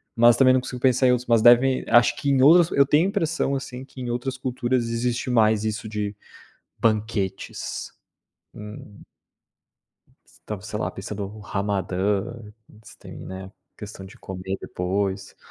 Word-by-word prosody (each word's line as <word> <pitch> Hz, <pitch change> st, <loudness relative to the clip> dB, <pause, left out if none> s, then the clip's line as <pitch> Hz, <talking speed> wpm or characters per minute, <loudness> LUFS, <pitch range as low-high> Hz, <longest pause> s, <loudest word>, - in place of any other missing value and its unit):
mas 120 Hz, 0 st, +5 dB
também 130 Hz, -1 st, +6 dB
não 130 Hz, -, +2 dB
consigo 125 Hz, -1 st, -7 dB
pensar 130 Hz, 0 st, +3 dB
em -, -, +5 dB
outros 125 Hz, 0 st, 0 dB
mas 115 Hz, -2 st, +4 dB
devem 125 Hz, +3 st, +5 dB
acho 120 Hz, +1 st, +4 dB
que 140 Hz, -, -2 dB
em 135 Hz, -2 st, +3 dB
outros 165 Hz, +3 st, +7 dB
eu 140 Hz, -, +6 dB
tenho 150 Hz, +5 st, +3 dB
a -, -, -1 dB
impressão 165 Hz, -8 st, -1 dB
assim 130 Hz, -1 st, -6 dB
que 135 Hz, -, -14 dB
em 125 Hz, -, -4 dB
outras 125 Hz, +2 st, -3 dB
culturas 125 Hz, -1 st, -1 dB
existe 120 Hz, +2 st, -2 dB
mais 110 Hz, -2 st, +3 dB
isso 110 Hz, 0 st, -3 dB
de 105 Hz, -1 st, -3 dB, 0.6 s
banquetes, 105 Hz, -3 st, -2 dB, 0.6 s
hum. 105 Hz, -1 st, -11 dB, 1.5 s
Estava 105 Hz, -3 st, -5 dB
sei 105 Hz, 0 st, -6 dB
lá 90 Hz, -, -1 dB
pensando 100 Hz, +2 st, -6 dB
o 105 Hz, +3 st, -9 dB
Ramadã, 100 Hz, 0 st, -1 dB, 0.4 s
existem, 110 Hz, 0 st, -14 dB
né, 95 Hz, +1 st, -9 dB, 0.3 s
questão 105 Hz, -2 st, -9 dB
de 95 Hz, -, -14 dB
comer 95 Hz, +1 st, -6 dB
depois. 95 Hz, +2 st, -3 dB
110 Hz, 155 wpm, -24 LUFS, 100-130 Hz, 1.5 s, outros